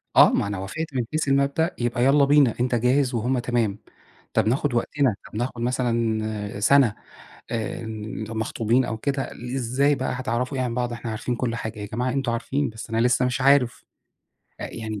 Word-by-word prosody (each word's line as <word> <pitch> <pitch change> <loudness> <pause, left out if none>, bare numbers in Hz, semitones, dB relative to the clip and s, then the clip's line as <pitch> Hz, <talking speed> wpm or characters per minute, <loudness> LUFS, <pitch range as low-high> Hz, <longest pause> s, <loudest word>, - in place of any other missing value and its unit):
آه، - - +8
ما - - +1
أنا 100 -2 -3
وافقت 150 - -5
من 125 -2 0
حيث 155 -2 -1
المبدأ 140 +5 +1
يبقى 120 0 0
يالّا 140 +1 +5
بينا، 140 -4 +5
أنت 125 0 +1
جاهز 125 +2 +2
وهُم 125 +3 0
تمام 115 -4 0 0.6
طَب - - +2
ناخد 130 +1 0
وقتنا، 130 -1 +1 0.2
نطَب 115 - -1
اخد 120 -2 -4
مثلًا 110 -4 -1
سنة 130 -1 +5 0.6
آآ، 115 -1 -3 0.5
مخطوبين 115 +2 0
أو 110 - -3
كده، 135 +3 -2 0.3
إزاي 135 +4 +2
بقى 130 -1 -2
هتعرَفوا 125 +1 -2
إيه 130 - +1
عن 120 -2 -2
بعض، 120 -1 -1
إحنا 115 -1 -5
عارفين 120 +3 -3
كلّ 115 -1 -1
حاجة 110 -1 -5
يا 105 - -4
جماعة، 125 +5 -2
أنتم 135 -3 -1
عارفين، 135 +3 -1
بس 110 +1 -9
أنا 115 - 0
لسه 125 +1 +3
مش 125 +1 -1
عارف 135 -2 +3 0.7
يعني. 110 -2 -5
120 Hz, 180 wpm, -24 LUFS, 115-135 Hz, 0.7 s, آه